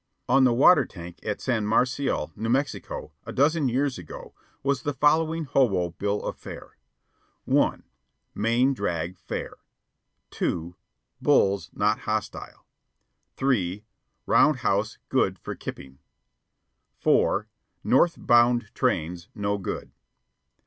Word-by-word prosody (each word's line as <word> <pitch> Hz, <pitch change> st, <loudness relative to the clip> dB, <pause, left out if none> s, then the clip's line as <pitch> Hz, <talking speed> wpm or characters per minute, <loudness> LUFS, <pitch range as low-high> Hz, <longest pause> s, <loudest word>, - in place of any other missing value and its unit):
On 130 Hz, +1 st, +5 dB
the 125 Hz, -, +4 dB
water 145 Hz, +4 st, +6 dB
tank 85 Hz, -5 st, -10 dB
at 105 Hz, -1 st, -4 dB
San 110 Hz, -5 st, 0 dB
Marcial, 125 Hz, +5 st, 0 dB
New 110 Hz, +2 st, -3 dB
Mexico, 130 Hz, -, -2 dB
a -, -, -7 dB
dozen 145 Hz, 0 st, +2 dB
years 130 Hz, -1 st, 0 dB
ago, 85 Hz, -, -10 dB, 0.3 s
was 140 Hz, -2 st, 0 dB
the 145 Hz, +1 st, -3 dB
following 160 Hz, +4 st, +2 dB
hobo 100 Hz, -, +1 dB
bill 100 Hz, +4 st, -2 dB
of -, -, -3 dB
fare: -, -, -10 dB, 0.7 s
(1) -, -, +2 dB, 0.5 s
Main 120 Hz, +5 st, +2 dB
drag 90 Hz, -6 st, -3 dB
fair. -, -, -6 dB, 0.7 s
(2) 85 Hz, +1 st, -2 dB, 0.5 s
Bulls 100 Hz, 0 st, +3 dB
not 105 Hz, +1 st, +1 dB
hostile. 110 Hz, -1 st, -4 dB, 0.7 s
(3) 105 Hz, -7 st, 0 dB, 0.4 s
Round 150 Hz, -, +4 dB
house 105 Hz, -1 st, 0 dB
good -, -, +1 dB
for -, -, -6 dB
kipping. 65 Hz, 0 st, -9 dB, 1.0 s
(4) 105 Hz, +2 st, +2 dB, 0.4 s
North 170 Hz, +6 st, +3 dB
bound 120 Hz, -2 st, +3 dB
trains 85 Hz, +3 st, -1 dB
no 100 Hz, -1 st, -1 dB
good. 95 Hz, -, -5 dB
115 Hz, 115 wpm, -26 LUFS, 100-135 Hz, 1.0 s, water